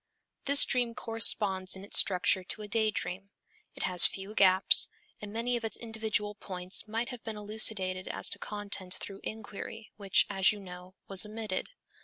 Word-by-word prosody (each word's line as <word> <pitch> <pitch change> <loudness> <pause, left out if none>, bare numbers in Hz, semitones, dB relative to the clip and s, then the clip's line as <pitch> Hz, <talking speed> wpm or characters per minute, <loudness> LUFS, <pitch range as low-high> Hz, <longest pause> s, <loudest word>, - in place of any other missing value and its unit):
This 280 0 +7
dream 240 -2 -1
corresponds 205 -5 +1
in 190 - -11
its 200 - -2
structure 185 0 +2
to 200 - -4
a - - -8
day 220 +1 0
dream. 195 -2 -6 0.5
It - - -6
has 180 -2 +8
few 195 +2 -8
gaps, 190 -2 +5 0.3
and 210 -1 -8
many 235 +3 -2
of 235 - -5
its 225 - -4
individual 220 -2 -4
points 185 -1 -3
might 225 +3 -4
have 245 -3 -10
been 220 -2 -7
elucidated 205 -3 +1
as - - -1
to - - 0
content 200 -3 -4
through 195 0 -9
inquiry, 220 +1 -9
which, 200 -2 +1
as 195 -2 +1
you 210 - -8
know, 180 -1 -12
was 195 0 +2
omitted. 210 -2 -5
205 Hz, 175 wpm, -29 LUFS, 190-220 Hz, 0.5 s, has